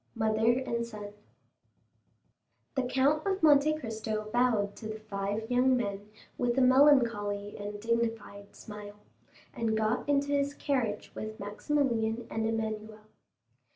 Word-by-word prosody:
Mother 220 +1 +2
and 235 -2 -1
Son 210 -3 -8 1.6
The 265 - +1
Count 270 +4 +2
of 385 -2 -1
Monte 305 0 +5
Cristo 220 -4 -4
bowed 230 -5 +2
to 220 - -7
the 215 0 -6
five 205 +1 -3
young 255 +1 +4
men 205 -3 -4 0.3
with 245 0 0
a - - +4
melancholy 235 -7 +4
and 205 0 -5
dignified 225 -3 -2
smile, 210 -1 -10 0.6
and 220 -1 -1
got 220 +6 0
into 285 0 +2
his 285 0 0
carriage 240 -7 -2
with 215 0 -6
Maximilian 225 +1 -1
and 220 0 -1
Emmanuel. 220 -1 -3
225 Hz, 125 wpm, -30 LUFS, 210-255 Hz, 1.6 s, Monte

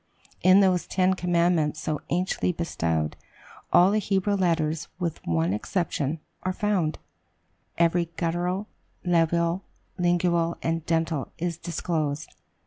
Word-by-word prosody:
In 185 +2 +7
those 185 -2 +2
ten 185 0 +2
commandments 170 -4 +1
so 155 -1 -2
anciently 180 +1 0
bestowed, 80 - -1 0.6
all 180 +3 +6
the 215 - +2
Hebrew 200 0 0
letters, 165 -4 +1
with 170 -3 -3
one 85 +2 +1
exception, 155 - -1 0.2
are 185 - -1
found 185 -6 0 0.8
every 170 +1 +3
guttural, 180 +4 -1 0.4
labial, 170 +1 +2 0.4
lingual, 175 -1 +2
and 165 0 -1
dental 165 -4 0
is 170 -1 -3
disclosed. 155 -3 -2
170 Hz, 115 wpm, -26 LUFS, 160-180 Hz, 0.8 s, In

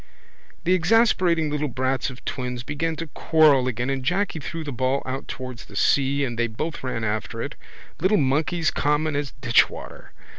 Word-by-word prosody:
The 180 - +3
exasperating 180 -4 +3
little 150 0 -1
brats 130 +1 -1
of 130 -1 -12
twins 125 -2 -4
began 160 +4 -2
to 165 - -4
quarrel 150 -5 +4
again 125 +2 -1
and 135 -1 -2
Jacky 180 +4 0
threw 165 +3 -5
the 145 - -5
ball 130 +2 0
out 130 +1 -4
towards 130 0 -7
the - - -14
sea 140 0 +2
and 120 -2 -4
they 120 - +2
both 150 +9 -5
ran 125 -3 -3
after 110 -1 -2
it. - - -4 0.5
Little 190 +5 +3
monkeys 155 +4 +1
common 150 +1 +1
as 145 -2 -2
ditchwater. 120 -2 +1
140 Hz, 175 wpm, -24 LUFS, 130-160 Hz, 0.5 s, quarrel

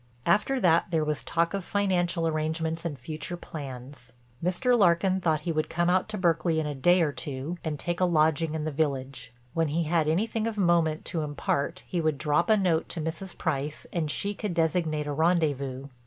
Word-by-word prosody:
After 210 +10 +2
that 170 -5 +3
there 160 -3 +1
was 150 -1 -2
talk 170 +1 0
of 195 -1 -2
financial 175 -4 +1
arrangements 160 +1 -2
and 150 -4 -3
future 155 +7 -5
plans. 130 -5 -9 0.3
Mr. 185 +8 +2
Larkin 190 -2 +3
thought 160 -3 +1
he 170 - -2
would 155 -1 -1
come 175 +1 +1
out 185 +3 +1
to 215 - -3
Berkeley 165 -3 +2
in 155 - -1
a 150 - -2
day 175 +6 +4
or 150 - +1
two 140 +5 -5
and 155 -2 -2
take 175 +3 -3
a 185 - +4
lodging 160 -1 +2
in 155 - -2
the 155 - -2
village. 135 -4 -2 0.2
When 165 -1 +1
he 160 +3 0
had 160 -1 +1
anything 215 +6 0
of 225 -2 -4
moment 170 -4 +2
to 165 - -2
impart 150 +3 -2
he 175 - -2
would 155 -2 +1
drop 150 +6 +1
a 215 - +6
note 175 -5 +1
to 170 - -4
Mrs. 165 +4 -4
Price 150 -2 -2
and 165 -3 -1
she 200 +7 -1
could 205 -3 -4
designate 160 -2 +1
a 145 - -3
rendezvous. 140 -5 0
160 Hz, 200 wpm, -27 LUFS, 150-175 Hz, 0.3 s, a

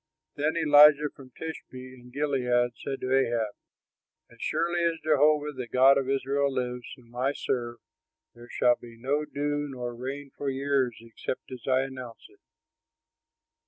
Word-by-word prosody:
Then 155 +3 -1
Elijah 150 -1 +7
from 135 -2 -13
Tishbe 160 0 -8 0.2
in 125 -1 -15
Gilead 125 -3 +1
said 135 -1 -4
to 130 +1 +1
Ahab, 115 -5 +1 0.8
"As 115 - -17
surely 170 +1 0
as 165 -1 +1
Jehovah 150 0 +3
the 125 -2 -5
God 135 +3 +5
of 135 -1 -3
Israel 140 +1 +1
lives, 125 -1 -3
whom 120 -2 -20
I 130 +3 0
serve, 120 -4 -3 0.6
there 120 +1 -14
shall 120 -1 +3
be 115 -1 -13
no 145 +5 0
dew 145 0 -2
nor 125 -2 -5
rain 135 +3 -6
for 140 - -3
years 135 -2 0
except 115 +3 -6
as 125 0 -9
I 130 0 +3
announce 130 -3 -7
it." 400 0 -24
135 Hz, 155 wpm, -28 LUFS, 125-145 Hz, 0.8 s, Elijah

